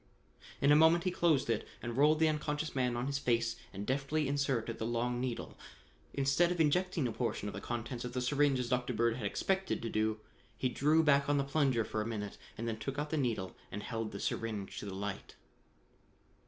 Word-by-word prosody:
In 140 - +5
a - - +8
moment 160 +2 +6
he 185 - +1
closed 165 -6 +2
it 115 -2 -1
and 120 -1 -5
rolled 150 +4 +5
the 160 0 +4
unconscious 150 0 -1
man 125 -2 0
on 120 - -1
his 140 0 -1
face 115 -3 +1 0.2
and 100 +1 -6
deftly 140 +4 0
inserted 135 -5 -1
the 110 - -2
long 120 +1 0
needle. 125 -2 -4 0.6
Instead 140 +6 +3
of 175 - -2
injecting 165 -1 +2
a - - -2
portion 115 -3 -2
of 105 - -4
the - - -6
contents 120 +1 -4
of 125 0 -5
the 125 - -1
syringe 140 +1 +3
as 125 -1 -2
Dr. 125 0 0
Bird 115 +1 +1
had 110 -5 -2
expected 190 - 0
to 115 - -2
do, 110 0 0 0.4
he 130 - 0
drew 150 +6 +3
back 140 -2 +4
on 145 - +3
the 140 - +2
plunger 135 -5 +1
for 110 - -2
a 105 - -3
minute 105 -3 -5 0.2
and 115 - -3
then 110 -1 -3
took 135 +5 -4
out 150 +1 -2
the - - +1
needle 115 -9 -1 0.2
and 105 - -5
held 115 -2 -3
the 100 - -6
syringe 105 -3 -3
to 105 - -6
the 95 - -5
light. 100 0 -5
125 Hz, 220 wpm, -33 LUFS, 115-145 Hz, 0.6 s, a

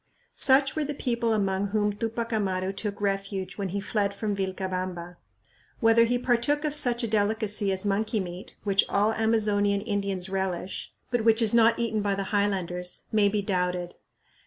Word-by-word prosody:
Such 270 0 +3
were 310 - 0
the 295 0 -4
people 235 -3 -1
among 200 -2 0
whom 210 0 0
Tupac 230 +2 -3
Amaru 190 -3 -1
took 205 0 -5
refuge 195 -1 -2
when 195 -1 -2
he 200 +3 -2
fled 200 0 -1
from 205 0 -2
Vilcabamba. 185 -2 -4 0.6
Whether 230 0 +5
he 245 +1 +1
partook 250 +5 +1
of 300 - -1
such 245 -5 +2
a - - 0
delicacy 210 -1 +1
as 190 +1 -1
monkey 210 +3 0
meat, 180 0 -7
which 200 -1 +3
all 210 +2 +2
Amazonian 210 -3 +1
Indians 200 -3 -2
relish, 190 -1 -3 0.2
but 240 -2 +1
which 225 0 +4
is 225 -2 +3
not 230 0 +5
eaten 225 -2 -1
by 200 -1 0
the 195 - -2
highlanders, 180 -3 0
may 210 -2 +4
be 205 0 -1
doubted. 180 -2 -1
205 Hz, 170 wpm, -27 LUFS, 195-225 Hz, 0.6 s, Whether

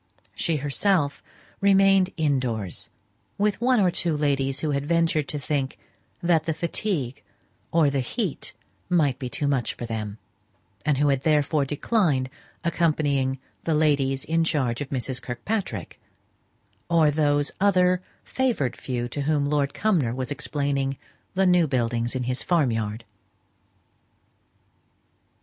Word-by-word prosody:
She 165 - 0
herself 145 +2 +1 0.4
remained 195 -1 +5
indoors, 125 - 0 0.5
with 210 +1 +1
one 250 0 +4
or 185 -3 +4
two 165 -2 -1
ladies 140 -2 0
who 155 - 0
had 140 -1 0
ventured 165 -3 +2
to 150 - -3
think 140 -1 -2 0.5
that 165 -2 +3
the 160 - -1
fatigue 165 - -2 0.5
or 160 -4 +4
the 140 - 0
heat 165 - -3 0.4
might 150 -8 +2
be 125 - -4
too 145 - -1
much 135 -4 0
for 120 - -5
them, 110 -2 -4 0.7
and 150 -2 +2
who 145 +1 +3
had 135 -2 +1
therefore 150 -1 +2
declined 145 - +1 0.3
accompanying 145 -6 +1 0.3
the 160 - +1
ladies 140 -3 +2
in 165 +1 +2
charge 130 -7 0
of 140 - -4
Mrs. 130 -1 -3
Kirkpatrick, 120 - -4 0.9
or 165 -3 +4
those 145 -1 +2
other 185 -2 +4 0.2
favoured 235 - 0
few 120 -2 -3
to 145 - -4
whom 145 0 +1
Lord 140 -2 +1
Cumnor 165 - +1
was 130 +1 -3
explaining 140 -2 -1 0.4
the 190 +1 +3
new 180 -3 +4
buildings 120 -2 -1
in 130 - -1
his 125 +1 -1
farm 160 -8 +2
yard. 110 0 -3
145 Hz, 135 wpm, -25 LUFS, 130-170 Hz, 0.9 s, remained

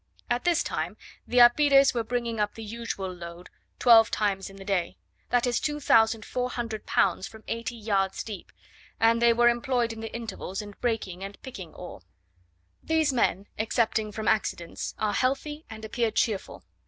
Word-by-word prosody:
At 240 +5 0
this 345 -1 +3
time - - -3 0.3
the 250 - -2
apires 275 +3 +6
were 235 -2 -1
bringing 235 -1 -2
up 210 0 0
the 225 - -7
usual 215 -4 -5
load 170 0 -10 0.3
twelve 225 -2 +7
times 200 -2 -1
in 195 - -13
the 195 0 -11
day; 190 -4 -1 0.3
that 245 0 +2
is 245 -1 +1
2400 235 -4 0
pounds 190 +1 +2
from 220 0 -14
eighty 230 +1 -3
yards 200 -4 -1
deep; 205 -5 -8 0.5
and 230 +1 +4
they 235 0 +6
were 240 +1 +4
employed 240 -1 +1
in 225 - -10
the 225 0 -6
intervals 220 -4 -5
in 205 -1 -7
breaking 200 -6 -2
and 195 0 -8
picking 190 - -9
ore. 180 - -9 0.8
These 320 -3 +1
men, 200 -5 +1
excepting 220 -1 0
from 215 0 -5
accidents, 190 -5 -1
are 210 -1 0
healthy, 295 +5 -1
and 220 0 -8
appear 230 +1 0
cheerful. 215 -2 -1
225 Hz, 165 wpm, -27 LUFS, 205-240 Hz, 0.8 s, twelve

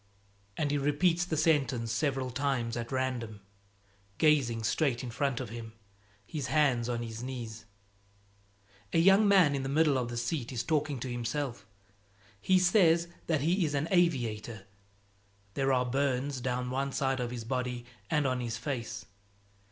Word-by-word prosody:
And 145 -2 0
he 145 - +1
repeats 165 +5 +2
the 160 -3 -2
sentence 140 -7 +1
several 130 +1 -1
times 120 -3 -1
at 120 +1 -5
random, 125 -5 -2 0.8
gazing 135 -8 +3
straight 130 +1 0
in 125 - -5
front 135 +1 -1
of 125 -4 -5
him, 115 -1 -8 0.5
his 140 +3 -4
hands 130 -4 +2
on 120 -1 -2
his 115 0 -6
knees. 120 -4 -6 1.3
A - - +3
young 195 +5 +6
man 185 -7 +5
in 140 - -1
the 135 - -3
middle 145 -2 +3
of 120 -1 -3
the 120 - -5
seat 120 +1 -2
is 120 -2 -2
talking 150 -2 0
to 130 - -4
himself. 120 -3 -3 0.7
He 185 - +4
says 175 -2 +4 0.2
that 155 -4 +1
he 175 +5 +2
is 150 -3 -1
an 140 +3 0
aviator. 120 - 0 0.9
There 135 -1 +1
are 125 -1 +2
burns 135 +1 -1
down 125 0 -2
one 135 +1 -1
side 135 -1 0
of 120 -1 -2
his 120 -1 -5
body 125 0 -3 0.2
and 150 -2 +1
on 130 -1 0
his 120 -2 -3
face. 120 -5 -4
130 Hz, 160 wpm, -30 LUFS, 120-150 Hz, 1.3 s, young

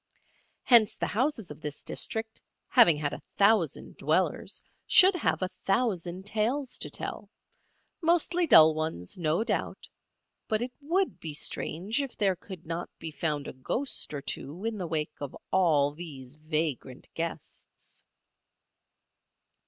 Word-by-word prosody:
Hence 230 -4 +6
the - - -1
houses 225 - -1
of 150 - -11
this 150 -1 -6
district, 220 0 -3 0.3
having 200 - +6
had 150 -1 -2
a - - -7 0.2
thousand 200 -4 +2
dwellers, - - 0 0.2
should 380 0 +7
have 350 - 0
a - - +1
thousand 190 -3 -1
tales 235 +6 -1
to - - -4
tell, - - -6 0.7
mostly 340 +1 +2
dull 160 - +8
ones, 155 - -3
no 165 +5 +1
doubt; 230 - -3 0.6
but 215 -2 +1
it 245 +2 -3
would 360 +6 0
be 155 -2 -6
strange 195 - -1
if 275 -3 -6
there 195 -3 +2
could 180 -1 -11
not 165 +2 -4
be 165 -1 -7
found 150 -2 -2
a - - -6
ghost 235 - -2
or 145 -2 -5
two 170 +9 -4
in 225 -1 -1
the 180 - -3
wake 155 -2 -2
of 145 - -5 0.2
all 155 -7 +3
these 145 -6 -9
vagrant 155 -4 -3
guests. 165 -2 -7
175 Hz, 140 wpm, -28 LUFS, 155-225 Hz, 0.7 s, dull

